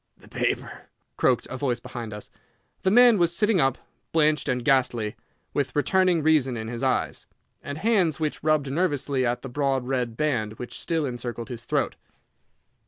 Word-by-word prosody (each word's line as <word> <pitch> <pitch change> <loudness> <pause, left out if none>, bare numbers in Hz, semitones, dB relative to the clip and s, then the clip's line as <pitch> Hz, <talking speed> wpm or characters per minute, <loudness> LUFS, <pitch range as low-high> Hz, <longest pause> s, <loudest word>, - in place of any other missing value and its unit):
"The - - -19
paper!" - - -3 0.3
croaked - - +2
a 130 - -4
voice 125 -3 -1
behind 120 -2 -7
us. 105 0 -9 0.5
The 190 - +2
man 240 0 +6
was 170 0 +2
sitting 210 -2 +3
up, 135 -1 +2 0.3
blanched 155 -1 +2
and 125 -1 -1
ghastly, 125 -6 +1 0.4
with 140 -3 -1
returning 180 +2 +3
reason 145 -6 +3
in 110 0 -5
his 120 0 -5
eyes, 130 -1 -1 0.3
and 145 0 -6
hands 185 -6 +2
which 155 -2 -2
rubbed 155 -3 +2
nervously 145 -5 0
at 120 +1 -2
the - - -5
broad 135 -1 0
red 125 -3 -2
band 120 -9 0
which 120 +2 -7
still 165 -3 -1
encircled 120 -1 -5
his 115 -2 -7
throat. - - -1
135 Hz, 170 wpm, -25 LUFS, 120-160 Hz, 0.5 s, man